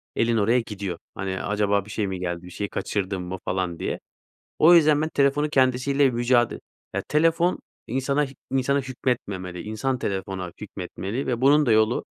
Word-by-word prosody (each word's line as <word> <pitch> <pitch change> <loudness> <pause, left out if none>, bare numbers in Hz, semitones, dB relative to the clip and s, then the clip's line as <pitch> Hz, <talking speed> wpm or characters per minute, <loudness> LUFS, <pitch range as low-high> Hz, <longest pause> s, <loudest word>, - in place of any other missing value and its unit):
elin 115 0 +2
oraya 115 +4 +3
gidiyor. 100 -6 -5 0.2
Hani, 95 0 -3
acaba 100 -1 +1
bir - - -13
şey 105 -2 -1
mi 95 -1 -4
geldi? 85 -1 -3
Bir 90 - -10
şey 100 +3 -4
kaçırdın 95 -2 -2
mı, 90 +1 -5
falan, 90 -2 -2
diye. - - -3 0.6
O 170 +3 +7
yüzden 155 -3 +5
ben 155 - 0
telefonun 145 0 +2
kendisiyle 135 0 +3
mücade 120 0 +2 0.4
ya, - - -1
telefon 165 +3 +2 0.3
insana 140 +4 0
h - - -11 0.2
insana 135 +1 +1
hükmetmemeli, 100 -9 -3
insan 115 +5 -2
telefona 95 -3 -3
hükmetmeli 100 +4 -5
ve 120 -1 -1
bunun 145 +2 +5
da 115 - +4
yolu 110 +2 +3
115 Hz, 170 wpm, -24 LUFS, 95-135 Hz, 0.6 s, O